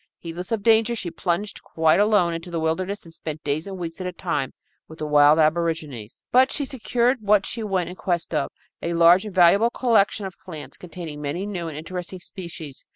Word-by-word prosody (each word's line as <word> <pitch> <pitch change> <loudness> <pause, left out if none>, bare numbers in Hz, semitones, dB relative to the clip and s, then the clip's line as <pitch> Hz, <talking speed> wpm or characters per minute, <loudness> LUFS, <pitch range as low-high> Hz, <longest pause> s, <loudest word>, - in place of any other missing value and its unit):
Heedless 175 +3 -7
of 220 -3 -1
danger, 225 +1 +4
she 180 -6 -5
plunged 175 +5 -2
quite 160 +2 +2
alone 205 -5 +3
into 165 +1 -6
the 170 -1 -2
wilderness 180 +6 -1
and 165 - -13
spent 155 -1 -6
days 150 +5 -2
and 195 -1 -6
weeks 170 0 -6
at 185 - -3
a - - -3
time 165 -7 -2 0.4
with 160 - -12
the 155 - -4
wild 150 0 +6
aborigines. 155 -7 -1
But 260 +2 +5
she 285 - -2
secured 250 -1 0
what 205 -1 +3
she 230 - -5
went 195 -4 -1
in 180 - -7
quest 175 -3 -2
of, 150 -3 0 0.3
a 170 0 -2
large 170 +4 +6
and 210 - -7
valuable 190 +6 +6
collection 225 -4 +2
of 190 - -8
plants, 155 -5 -9
containing 165 -4 -8
many 150 +7 -3
new 180 -5 -4
and 155 -2 -6
interesting 180 +3 -6
species. 170 -6 -9
175 Hz, 205 wpm, -24 LUFS, 160-200 Hz, 0.4 s, wild